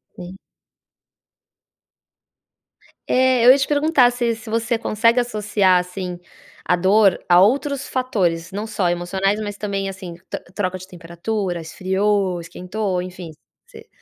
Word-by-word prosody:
Sim. 180 Hz, +1 st, -10 dB, 2.7 s
É, 255 Hz, -2 st, +3 dB
eu 250 Hz, -, +10 dB
ia 265 Hz, -, +6 dB
te 275 Hz, -, -1 dB
perguntar 290 Hz, -4 st, +3 dB
se 240 Hz, -2 st, -1 dB
se 225 Hz, 0 st, -11 dB
você 230 Hz, +1 st, 0 dB
consegue 230 Hz, +2 st, +2 dB
associar 210 Hz, -5 st, +2 dB
assim 180 Hz, 0 st, -6 dB, 0.5 s
a 180 Hz, -, +3 dB
dor 190 Hz, +2 st, +4 dB
a 175 Hz, +1 st, +6 dB
outros 275 Hz, +5 st, +1 dB
fatores, 185 Hz, -10 st, -1 dB
não 205 Hz, +3 st, -4 dB
só 205 Hz, -5 st, -1 dB
emocionais, 190 Hz, +4 st, -1 dB
mas 205 Hz, -1 st, -5 dB
também 195 Hz, -2 st, -3 dB
assim, 185 Hz, -3 st, -8 dB, 0.2 s
tro -, -, -4 dB
troca 185 Hz, -2 st, -2 dB
de 185 Hz, -, -12 dB
temperatura, 180 Hz, +2 st, -4 dB
esfriou, 190 Hz, +2 st, -1 dB
esquentou, 180 Hz, +3 st, -4 dB
enfim, 180 Hz, -2 st, -8 dB, 0.3 s
você -, -, -15 dB
195 Hz, 135 wpm, -20 LUFS, 180-230 Hz, 2.7 s, eu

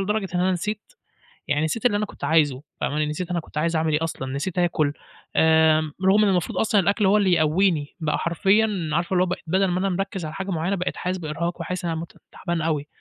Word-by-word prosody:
لدرجة 205 Hz, 0 st, -1 dB
إن 175 Hz, -, +1 dB
أنا 185 Hz, +1 st, +2 dB
نسيت 210 Hz, -, -4 dB, 0.6 s
يعني 150 Hz, +1 st, +1 dB
نسيت 220 Hz, +9 st, -3 dB
اللي 205 Hz, -4 st, +4 dB
أنا 210 Hz, -, -1 dB
كنت -, -, -14 dB
عايزه 145 Hz, -5 st, +2 dB, 0.2 s
فاهمة، 150 Hz, +1 st, 0 dB
نسيت 160 Hz, +4 st, -4 dB
أنا 175 Hz, -, 0 dB
كنت 155 Hz, -, -10 dB
عايز 165 Hz, +2 st, 0 dB
أعمل 160 Hz, -1 st, +1 dB
إيه 150 Hz, +2 st, +1 dB
أصلًا، 135 Hz, -5 st, -4 dB
نسيت 175 Hz, +6 st, -3 dB
آكُل، 155 Hz, -4 st, +1 dB, 0.4 s
آآ، 160 Hz, -1 st, +4 dB
رغم 205 Hz, +3 st, +5 dB
إن 205 Hz, -, +3 dB
المفروض 180 Hz, -3 st, 0 dB
أصلًا 210 Hz, -2 st, +3 dB
الأكْل 200 Hz, +2 st, +1 dB
هو 195 Hz, +2 st, +5 dB
اللي 195 Hz, -4 st, +3 dB
يقويني. 160 Hz, -1 st, +1 dB
بقى 155 Hz, -2 st, 0 dB
حرفيًا 195 Hz, +1 st, +1 dB
عارفة 170 Hz, +3 st, 0 dB
اللي 180 Hz, 0 st, +4 dB
هو -, -, -1 dB
ب -, -, -1 dB
بدل 190 Hz, +4 st, +2 dB
ما 180 Hz, 0 st, 0 dB
أنا 195 Hz, +1 st, 0 dB
مركّز 190 Hz, -1 st, -3 dB
على 155 Hz, -, -6 dB
حاجة 195 Hz, 0 st, -4 dB
معيّنة 175 Hz, +3 st, -1 dB
بقيت 180 Hz, -1 st, -3 dB
حاسس 185 Hz, +1 st, -2 dB
بإرهاق 170 Hz, +2 st, -3 dB
وحاسس 180 Hz, +1 st, -4 dB
إن 170 Hz, -, -1 dB
أنا 160 Hz, 0 st, -3 dB
مت 170 Hz, -, -10 dB
تعبان 170 Hz, -1 st, -3 dB
أوي، 150 Hz, -2 st, -1 dB
175 Hz, 235 wpm, -23 LUFS, 155-195 Hz, 0.6 s, رغم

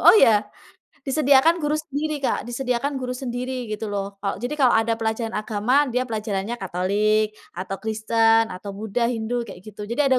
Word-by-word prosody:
oh -, -, +8 dB
ya? 225 Hz, -, +6 dB, 0.7 s
Disediakan 285 Hz, +3 st, +4 dB
guru 300 Hz, -2 st, 0 dB
sendiri 305 Hz, 0 st, -2 dB
Kak, -, -, +1 dB
disediakan 250 Hz, +3 st, -1 dB
guru 250 Hz, -1 st, -3 dB
sendiri, 250 Hz, 0 st, -3 dB, 0.2 s
gitu 215 Hz, +1 st, -4 dB
loh. 200 Hz, -1 st, -1 dB, 0.2 s
Kalo 195 Hz, -, -1 dB
jadi 260 Hz, +5 st, -2 dB
kalau 255 Hz, -3 st, +6 dB
ada 225 Hz, 0 st, +1 dB
pelajaran 225 Hz, 0 st, -2 dB
agama, 215 Hz, +2 st, -2 dB, 0.2 s
dia 250 Hz, -, +1 dB
pelajarannya 215 Hz, -1 st, -2 dB
Katolik, 205 Hz, +4 st, +2 dB, 0.3 s
atau 190 Hz, +1 st, -3 dB
Kristen, 225 Hz, +1 st, +3 dB
atau 200 Hz, +2 st, -7 dB
Buddha, 220 Hz, +2 st, -2 dB
Hindu, 225 Hz, 0 st, -3 dB
kayak 190 Hz, -4 st, -10 dB
gitu, 210 Hz, -1 st, -10 dB
jadi 280 Hz, +4 st, +2 dB
ada 260 Hz, -1 st, +4 dB
230 Hz, 170 wpm, -23 LUFS, 215-260 Hz, 0.7 s, oh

